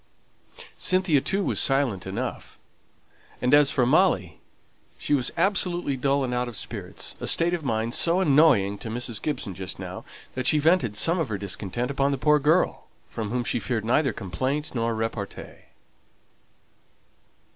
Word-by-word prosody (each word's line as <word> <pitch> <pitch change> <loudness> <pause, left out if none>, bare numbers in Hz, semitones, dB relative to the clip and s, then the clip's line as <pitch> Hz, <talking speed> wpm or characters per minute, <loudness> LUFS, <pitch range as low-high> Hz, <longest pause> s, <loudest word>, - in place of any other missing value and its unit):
Cynthia 185 -6 +3
too 195 +7 -1
was - - +1
silent 130 -10 +2
enough; 95 - -5 0.8
and 125 +2 0
as 145 -1 +6
for 130 -3 +1
Molly, 120 - +2 0.6
she - - -2
was 130 -4 +3
absolutely 175 -5 +1
dull 140 +1 0
and 125 -1 -3
out 125 0 -1
of 120 -4 -5
spirits, - - -5
a - - -5
state 170 +1 +2
of 170 -3 -3
mind 115 -2 -2
so 170 +5 +3
annoying 140 - +3
to 115 - -7
Mrs. 115 -1 -3
Gibson 140 -10 -2
just 95 0 -6
now, 95 0 -8 0.3
that 130 -1 -3
she 155 - +4
vented 150 - +2
some 170 - +4
of 155 -7 -2
her 105 - -2
discontent 100 +5 -3
upon 140 0 0
the 140 - -1
poor 150 +3 +3
girl, 155 +5 +1 0.2
from 110 -2 -4
whom 125 +2 -2
she 120 - -1
feared 110 +1 -3
neither 135 +3 +2
complaint 130 - -3
nor 115 -2 -1
repartee. 110 -2 -6
130 Hz, 160 wpm, -25 LUFS, 110-150 Hz, 0.8 s, as